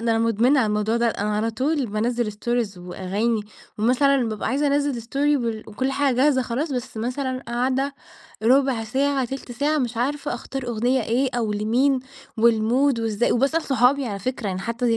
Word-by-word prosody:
ده 230 0 0
أنا 225 - +2
مدمنة 230 +5 +3
على 225 - +2
الموضوع 210 +2 0
ده. 235 0 +2
أنا 210 -1 -1
على 225 +2 0
طول 275 +3 0
بانزِّل 225 +1 -1
stories 230 -1 -2
وأغاني، 195 +5 -2 0.4
ومثلًا 255 +2 +3
بابقى 215 -2 -3
عايزة 285 +2 +1
أنزِّل 280 -4 0
story 285 +5 +1
بال 225 -2 -3
وكل 260 +5 -2
حاجة 275 -1 +1
جاهزة 265 -1 +3
خلاص. 270 +6 -2
بس 245 -3 -4
مثلًا 255 +3 -3
قاعدة 260 +3 0 0.5
ربع 255 -1 +3
ساعة، 270 +3 0
تلت 265 0 -6
ساعة، 290 +5 0
مش 245 -3 -2
عارفة 280 +5 -1
أختار 255 +1 -6
أغنية 245 +2 +1
إيه؟ 250 +5 +1
أو 225 -3 0
لمين، 245 +6 +2 0.4
والmood 235 +3 +3
وإزا 225 0 +1
وباسأل 280 +7 +1
صحابي 265 +1 +2
على 200 -3 -4
فكرة. 245 +1 -3
يعني 185 -1 -2
حتى 230 +1 0
245 Hz, 175 wpm, -23 LUFS, 225-270 Hz, 0.5 s, مدمنة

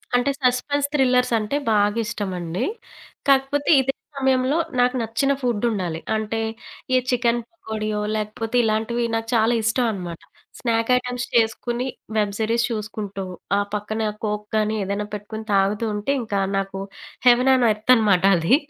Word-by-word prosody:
అంటే, 245 +3 +2
సస్పెన్స్ 280 +3 +1
థ్రిల్లర్సంటే 250 -3 +2
బాగా 205 +1 +3
ఇష్టమండి. 185 -6 -3 0.6
కాకపోతే 275 +1 +2
ఇదే 270 +1 -1 0.2
సమయంలో, 265 +2 +2 0.2
నాకు 250 +1 +3
నచ్చిన 230 +5 0
ఫుడ్డుండాలి. 210 -8 -1 0.2
అంటే, 220 +1 -2 0.5
ఈ - - +6
చికెన్ 240 -1 +2
పకోడియో, 215 -9 -4 0.2
లేకపోతే 220 +2 -3
ఇలాంటివి 225 +2 0
నాకు 225 0 -2
చాలా 225 +1 +3
ఇష్టం 230 +3 +2
అనమాట. 175 -4 -6 0.4
స్నాక్ 230 -1 0
ఐటెమ్స్ 250 -1 -3
చేసుకొని, 240 +2 +1 0.3
వెబ్ 205 -1 +1
సరీస్ 230 +2 +1
చూసుకుంటూ, 210 -3 -4 0.3
ఆ - - +3 0.2
పక్కన 215 +1 -2 0.2
కోక్ 210 0 -2
కానీ 215 0 +1
ఏదైనా 200 +2 -2
పెట్టుకొని 215 +1 -6
తాగుతూ 200 +3 +2
ఉంటే 210 +7 -1
ఇంకా 210 -3 -2 0.2
నాకు 195 0 -3 0.5
హెవన్ 250 +2 +6
ఆన్ 250 - +3
ఎర్త్ 215 +4 +3
అనమాట 205 -6 +3
అది. 165 +11 +4
225 Hz, 135 wpm, -23 LUFS, 210-250 Hz, 0.6 s, ఈ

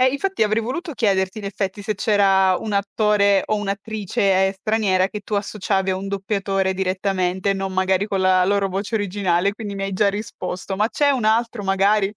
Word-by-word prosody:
Eh, 255 - +5
infatti, 380 - -1
avrei 215 +1 +1
voluto 305 +8 -4
chiederti, 195 -3 0
in 205 - -8
effetti, 195 0 -4
se 215 +1 -2
c'era 195 -2 +3
un 215 - -5
attore 200 0 +2
o 215 - 0
un'attrice 200 -2 0
straniera, 195 -2 +1
che 210 0 -6
tu 210 +1 -5
associavi 195 -1 -1
a 185 - 0
un 195 +1 -5
doppiatore 195 -1 -1
direttamente, 185 0 -1
non 195 -1 -3
magari 190 +2 +1
con 195 -2 -1
la 185 -1 +4
loro 200 -1 +1
voce 195 +4 -4
originale, 200 -2 0
quindi 205 -2 -7
mi 195 - -4
hai 195 0 -3
già 200 +2 +2
risposto. 200 -2 -5
Ma 210 +3 +1
c'è 285 +2 +2
un 255 -5 0
altro, 225 0 +1
magari? 195 +1 +2
200 Hz, 185 wpm, -21 LUFS, 190-210 Hz, -, Eh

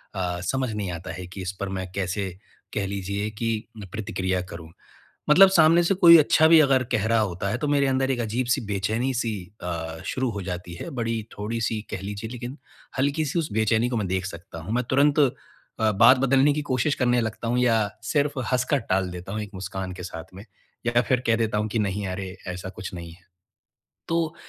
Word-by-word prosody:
अ, 90 -2 -2
समझ 130 +5 -1
नहीं 100 -3 -3
आता 90 +2 -6
है 90 +1 -7
कि 95 +2 -8
इस 90 0 -3
पर 100 - -3
मैं 95 -1 -4
कैसे 95 0 -2 0.4
कह 100 -2 -1
लीजिए 100 +1 -3
कि 115 +1 -1 0.3
प्रतिक्रिया 95 -3 -2
करूँ। 80 -1 -9 0.6
मतलब 190 +6 +9
सामने 165 -1 +6
से 195 - +2
कोई 170 -2 +9
अच्छा 155 +1 +5
भी 165 0 +8
अगर 135 -3 +4
कह 105 - +1
रहा 115 0 +3
होता 100 -2 -2
है 115 +5 -1
तो 150 - -2
मेरे 140 -1 +3
अंदर 135 0 +1
एक 125 -2 0
अजीब-सी 120 +2 0
बेचैनी-सी 110 +4 -1 0.3
अ, 80 -2 -4
शुरू 130 -1 -1
हो 100 -3 -5
जाती 90 -1 -5
है, - - -7
बड़ी 115 -3 -2 0.2
थोड़ी-सी 110 +1 -2
कह - - -4
लीजिए 105 +3 -5
लेकिन 125 +2 -6 0.4
हल्की-सी 145 +4 0
उस 160 -6 -2
बेचैनी 110 +2 +2
को 125 - -2
मैं 105 -3 -1
देख 95 0 -1
सकता 85 -2 -9
हूँ। 85 +7 -5
मैं 125 +1 +1
तुरंत 140 +3 +3
अ, 140 -3 +5 0.6
बात 120 +6 +6
बदलने 135 +2 +4
की 150 - -2
कोशिश 130 +4 +1
करने 120 -1 +2
लगता 115 0 -3
हूँ 120 +1 +1
या 115 -4 +3 0.2
सिर्फ़ 145 -1 +1
हँसकर 130 +3 +2
टाल 95 0 +1
देता 90 +2 -7
हूँ 110 - -2
एक 105 - -8
मुस्कान 95 0 -5
के 90 0 -8
साथ 80 -2 -7
में, 95 +2 -10 0.4
या 120 0 +3
फिर 125 0 +1
कह 115 - +4
देता 110 -2 0
हूँ 105 +1 -1
कि 115 - -2
नहीं 100 -1 -1
अरे, 95 +1 -5
ऐसा 90 +1 -5
कुछ 95 -1 -7
नहीं 85 -1 -8
है। 90 +2 -20 0.8
तो 165 -1 0
110 Hz, 205 wpm, -25 LUFS, 95-130 Hz, 0.8 s, मतलब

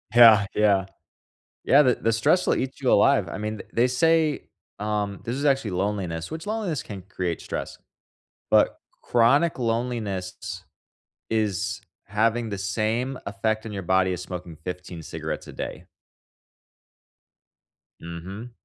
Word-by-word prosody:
Yeah, 115 -4 +9
yeah. 100 -3 +3 0.8
Yeah, 145 +2 +6
the 125 -3 +4
the 115 - 0
stress 145 +11 +3
will - - +3
eat 135 +2 -3
you 130 - +2
alive. 135 -11 +4
I - - -5
mean, 105 0 -3
th - - -10
they 120 +2 +3
say, 155 +4 +2 0.3
um, 105 -2 -2
this 120 +3 -3
is 140 - -3
actually 135 -8 +2
loneliness, 90 -4 -2
which 160 +4 -6
loneliness 210 -9 -2
can 100 -3 -8
create 90 -3 -3
stress. - - -5 0.7
But - - +4 0.2
chronic 135 +7 +3
loneliness 115 -6 -3 0.7
is 105 -2 0 0.3
having 110 +3 +1
the 100 - -3
same 110 +6 -1
effect 110 +2 -1
in 105 - -6
your 100 -1 -4
body 95 0 +3
as 90 - -4
smoking 90 -3 -7
15 90 -2 -6
cigarettes - - -5
a - - -8
day. - - -6 2.2
Mhm. 95 +8 -7
110 Hz, 140 wpm, -25 LUFS, 95-125 Hz, 2.2 s, Yeah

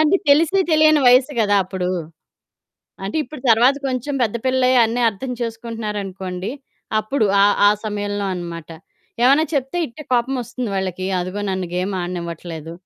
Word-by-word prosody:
అంటే 310 +5 +4
తెలిసి 320 +6 +4
తెలియని 310 -1 +5
వయస్సు 255 +4 +5
కదా! 205 -1 +2
అప్పుడు. 185 -1 -3 1.2
అంటే 200 - -3
ఇప్పుడు 300 -4 -10
తరువాత 245 +5 +5
కొంచెం 260 +3 -3
పెద్ద 225 0 0
పిల్లలై 255 0 +3
అన్నీ 230 +2 -1
అర్థం 250 +6 -7
చేసుకుంటున్నారనుకోండి. 210 -5 -5 0.5
అప్పుడు 215 0 0 0.2
ఆహ్, 205 0 +4
ఆ - - +6
సమయంలో 205 -1 -3
అనమాట. 170 -2 -7 0.5
ఏమన్నా 280 +5 +5
చెప్తే 270 +5 -1
ఇట్టే 300 +5 -11
కోపమొస్తుంది 245 -2 -1
వాళ్ళకి 185 -1 -3
అదిగో 185 +3 -4
నన్ను 185 -1 -2
గేమాడనివ్వట్లేదు. 175 -3 -4
220 Hz, 130 wpm, -20 LUFS, 185-260 Hz, 1.2 s, ఆ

